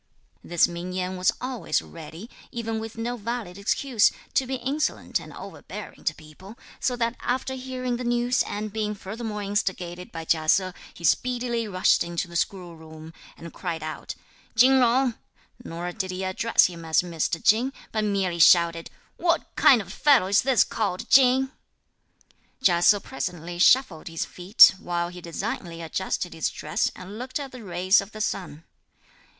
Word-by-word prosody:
This 175 Hz, -1 st, +3 dB
Ming 175 Hz, +1 st, -6 dB
Yen 185 Hz, 0 st, -2 dB
was 185 Hz, 0 st, +2 dB
always 250 Hz, -9 st, -1 dB
ready, 165 Hz, +5 st, -10 dB, 0.2 s
even 225 Hz, -1 st, -3 dB
with 225 Hz, 0 st, -8 dB
no 240 Hz, +2 st, -3 dB
valid 225 Hz, -4 st, -5 dB
excuse, 225 Hz, +2 st, +2 dB, 0.2 s
to 260 Hz, -, +1 dB
be 265 Hz, -, -2 dB
insolent 270 Hz, +5 st, -2 dB
and -, -, -11 dB
overbearing -, -, -10 dB
to -, -, 0 dB
people, 175 Hz, +8 st, -14 dB, 0.2 s
so 250 Hz, -, 0 dB
that 235 Hz, 0 st, -1 dB
after 260 Hz, +1 st, -2 dB
hearing 255 Hz, -1 st, -4 dB
the 250 Hz, -, -5 dB
news 240 Hz, +1 st, +1 dB
and 210 Hz, 0 st, -4 dB
being 210 Hz, -1 st, -2 dB
furthermore 210 Hz, +1 st, -6 dB
instigated 185 Hz, -3 st, -3 dB
by 165 Hz, -1 st, -7 dB
Chia 155 Hz, -1 st, +1 dB
Se, 185 Hz, +1 st, +3 dB, 0.2 s
he 170 Hz, -, -13 dB
speedily 240 Hz, +5 st, 0 dB
rushed 185 Hz, -2 st, +3 dB
into 170 Hz, +1 st, -3 dB
the 170 Hz, -, -12 dB
schoolroom 160 Hz, -3 st, -5 dB, 0.2 s
and 170 Hz, 0 st, -10 dB
cried 165 Hz, -4 st, -4 dB
out 155 Hz, 0 st, -6 dB, 0.4 s
"Chin 260 Hz, +4 st, +6 dB
Jung;" 250 Hz, +1 st, +3 dB, 0.5 s
nor 175 Hz, -3 st, -5 dB
did 190 Hz, 0 st, -4 dB
he 185 Hz, +1 st, -4 dB
address 230 Hz, +5 st, +3 dB
him 170 Hz, -2 st, -4 dB
as 160 Hz, +1 st, +2 dB
Mr. 165 Hz, -1 st, -2 dB
Chin, 235 Hz, +5 st, +4 dB, 0.2 s
but 215 Hz, -1 st, -1 dB
merely 195 Hz, -4 st, -1 dB
shouted 170 Hz, +1 st, +5 dB, 0.3 s
"What 340 Hz, 0 st, 0 dB
kind 240 Hz, -6 st, +6 dB
of 190 Hz, +1 st, -11 dB
fellow 285 Hz, -8 st, +4 dB
is 195 Hz, +3 st, +3 dB
this 255 Hz, -4 st, +4 dB
called 200 Hz, -5 st, -3 dB
Chin?" 260 Hz, 0 st, +5 dB, 1.1 s
Chia 175 Hz, -5 st, +4 dB
Se 205 Hz, +3 st, +6 dB
presently 175 Hz, -8 st, -5 dB
shuffled 185 Hz, -5 st, +4 dB
his 165 Hz, -1 st, -3 dB
feet, 185 Hz, +3 st, +6 dB
while 175 Hz, 0 st, -2 dB
he 180 Hz, 0 st, -10 dB
designedly 170 Hz, -1 st, -5 dB
adjusted 180 Hz, +2 st, -3 dB
his 160 Hz, -, -1 dB
dress 155 Hz, -, -1 dB
and 195 Hz, +4 st, -9 dB
looked 260 Hz, +3 st, -4 dB
at 275 Hz, -2 st, -6 dB
the 250 Hz, -3 st, -10 dB
rays 185 Hz, +1 st, +3 dB
of 200 Hz, +2 st, -11 dB
the 215 Hz, -, -6 dB
sun. 175 Hz, -7 st, -3 dB
195 Hz, 165 wpm, -25 LUFS, 175-240 Hz, 1.1 s, Chin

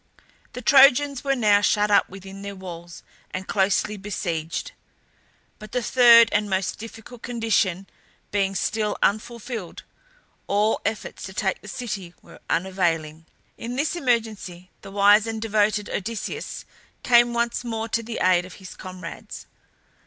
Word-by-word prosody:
The 250 Hz, -, -7 dB
Trojans 275 Hz, +1 st, +5 dB
were 275 Hz, -1 st, +1 dB
now 210 Hz, -4 st, +4 dB
shut 210 Hz, 0 st, +2 dB
up 200 Hz, -, +4 dB
within 195 Hz, +1 st, -10 dB
their 200 Hz, 0 st, -6 dB
walls 175 Hz, -2 st, -10 dB, 0.3 s
and 185 Hz, 0 st, -6 dB
closely 200 Hz, +2 st, +1 dB
besieged; 170 Hz, -5 st, -4 dB, 0.9 s
but 215 Hz, -1 st, -12 dB
the 250 Hz, -1 st, 0 dB
third 235 Hz, -2 st, +7 dB
and 210 Hz, 0 st, 0 dB
most 190 Hz, 0 st, -1 dB
difficult 225 Hz, +2 st, -11 dB
condition 220 Hz, -6 st, 0 dB, 0.5 s
being 195 Hz, -1 st, 0 dB
still 210 Hz, +3 st, -1 dB
unfulfilled, 225 Hz, -2 st, -2 dB, 0.6 s
all 210 Hz, +2 st, +1 dB
efforts 220 Hz, +1 st, -4 dB
to 190 Hz, -, -8 dB
take 190 Hz, 0 st, -1 dB
the -, -, -13 dB
city 205 Hz, -6 st, -6 dB
were -, -, -15 dB
unavailing. 165 Hz, -3 st, -1 dB, 0.3 s
In 235 Hz, +2 st, -5 dB
this 295 Hz, +6 st, -1 dB
emergency 220 Hz, -, -2 dB
the -, -, -10 dB
wise 205 Hz, +2 st, +5 dB
and 225 Hz, -1 st, -3 dB
devoted 215 Hz, -1 st, +1 dB
Odysseus 220 Hz, +2 st, -5 dB, 0.4 s
came 240 Hz, -1 st, +5 dB
once 235 Hz, +1 st, -1 dB
more 225 Hz, -2 st, -3 dB
to 230 Hz, -, 0 dB
the 230 Hz, 0 st, -6 dB
aid 180 Hz, -1 st, +4 dB
of 185 Hz, -, -11 dB
his 190 Hz, -, -11 dB
comrades. 185 Hz, -2 st, -9 dB
210 Hz, 140 wpm, -24 LUFS, 190-230 Hz, 0.9 s, third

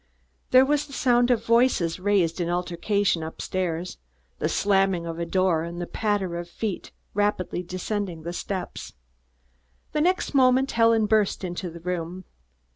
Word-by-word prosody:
There 255 Hz, +1 st, +7 dB
was 295 Hz, +1 st, +1 dB
the 280 Hz, -, -13 dB
sound 245 Hz, -2 st, +3 dB
of 230 Hz, -2 st, +1 dB
voices 230 Hz, -8 st, +2 dB
raised 185 Hz, -3 st, +1 dB
in 170 Hz, -, -1 dB
altercation 180 Hz, +2 st, 0 dB
up 160 Hz, 0 st, -7 dB
stairs, 180 Hz, -2 st, -3 dB, 0.4 s
the -, -, 0 dB
slamming 195 Hz, -3 st, +2 dB
of 165 Hz, 0 st, -5 dB
a 170 Hz, -, -2 dB
door 185 Hz, -2 st, +2 dB
and 170 Hz, +1 st, -6 dB
the 175 Hz, -, -3 dB
patter 200 Hz, -4 st, -1 dB
of 175 Hz, 0 st, -7 dB
feet 205 Hz, +1 st, -4 dB, 0.2 s
rapidly 205 Hz, -3 st, 0 dB
descending 185 Hz, -1 st, -4 dB
the 170 Hz, +1 st, -5 dB
steps. 185 Hz, 0 st, -5 dB, 1.0 s
The 300 Hz, -, 0 dB
next 360 Hz, +1 st, +1 dB
moment 260 Hz, 0 st, +4 dB
Helen 230 Hz, -1 st, +4 dB
burst 210 Hz, -2 st, +1 dB
into 180 Hz, 0 st, -4 dB
the 170 Hz, 0 st, -11 dB
room. 180 Hz, +1 st, -4 dB
190 Hz, 155 wpm, -25 LUFS, 175-225 Hz, 1.0 s, There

